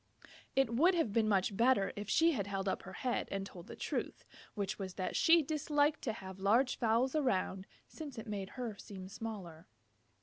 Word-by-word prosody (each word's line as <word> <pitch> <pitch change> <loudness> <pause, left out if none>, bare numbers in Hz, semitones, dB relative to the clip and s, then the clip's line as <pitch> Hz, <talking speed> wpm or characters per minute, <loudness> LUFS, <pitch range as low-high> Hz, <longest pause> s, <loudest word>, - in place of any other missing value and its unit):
It 270 -4 +3
would 340 +10 +5
have 315 -12 +1
been 220 -1 +3
much 195 0 +2
better 235 -2 +3
if 205 0 -6
she 330 +1 +5
had 205 - -2
held 195 -1 -2
up 190 - 0
her 190 - -10
head 250 - 0
and 195 0 -3
told 175 -3 -11
the - - -8
truth, - - -3 0.3
which 205 0 -2
was 190 -2 -5
that 185 - -3
she 330 -1 +6
disliked 295 0 +1
to 225 - 0
have 190 -3 -9
large 230 +7 +3
fowls 235 +4 +2
around, 195 -9 0 0.2
since 295 -6 -8
it 225 - -6
made 200 -3 -4
her 240 -4 -3
seem 190 -2 -8
smaller. 190 -6 -7
215 Hz, 195 wpm, -34 LUFS, 195-265 Hz, 0.3 s, she